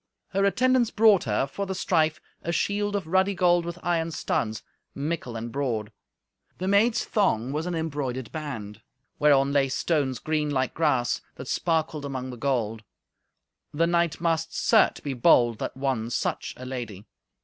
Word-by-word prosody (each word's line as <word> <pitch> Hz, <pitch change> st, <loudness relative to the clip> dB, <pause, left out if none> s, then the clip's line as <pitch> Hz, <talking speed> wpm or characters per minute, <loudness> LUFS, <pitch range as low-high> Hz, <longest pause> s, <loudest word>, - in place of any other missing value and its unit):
Her 195 Hz, +1 st, 0 dB
attendants 250 Hz, +3 st, +3 dB
brought 215 Hz, -3 st, +4 dB
her, 110 Hz, +3 st, +1 dB
for 200 Hz, +8 st, -5 dB
the 190 Hz, -, -3 dB
strife, 160 Hz, -4 st, +1 dB, 0.2 s
a 170 Hz, -, -3 dB
shield 205 Hz, +3 st, 0 dB
of 200 Hz, -4 st, -2 dB
ruddy 190 Hz, +4 st, +2 dB
gold 175 Hz, -1 st, +3 dB
with 170 Hz, 0 st, -5 dB
iron 165 Hz, -1 st, 0 dB
studs, 110 Hz, -8 st, -2 dB, 0.3 s
mickle 145 Hz, -4 st, -3 dB
and 115 Hz, +1 st, -5 dB
broad. 115 Hz, -6 st, -2 dB, 0.7 s
The 185 Hz, -, -3 dB
maid's 210 Hz, +4 st, +3 dB
thong 130 Hz, -, +1 dB
was 155 Hz, +4 st, -2 dB
an 180 Hz, -, -2 dB
embroidered 140 Hz, -6 st, -3 dB
band, 115 Hz, -10 st, -6 dB, 0.4 s
whereon 140 Hz, -2 st, +4 dB
lay 140 Hz, -1 st, +3 dB
stones 135 Hz, -2 st, 0 dB
green 155 Hz, +3 st, -1 dB
like 130 Hz, -3 st, 0 dB
grass, 140 Hz, -7 st, +1 dB
that -, -, -9 dB
sparkled 160 Hz, -2 st, 0 dB
among 130 Hz, -2 st, -4 dB
the -, -, -7 dB
gold. 115 Hz, -4 st, -1 dB, 0.9 s
The 165 Hz, +3 st, +3 dB
knight 170 Hz, -1 st, +1 dB
must, 165 Hz, -1 st, -1 dB
certes, 220 Hz, -3 st, +3 dB
be 140 Hz, -, -3 dB
bold 120 Hz, -2 st, +4 dB
that -, -, -4 dB
won 130 Hz, -4 st, -1 dB
such -, -, -2 dB
a 130 Hz, -, -8 dB
lady. 120 Hz, -6 st, -6 dB
150 Hz, 160 wpm, -26 LUFS, 130-175 Hz, 0.9 s, brought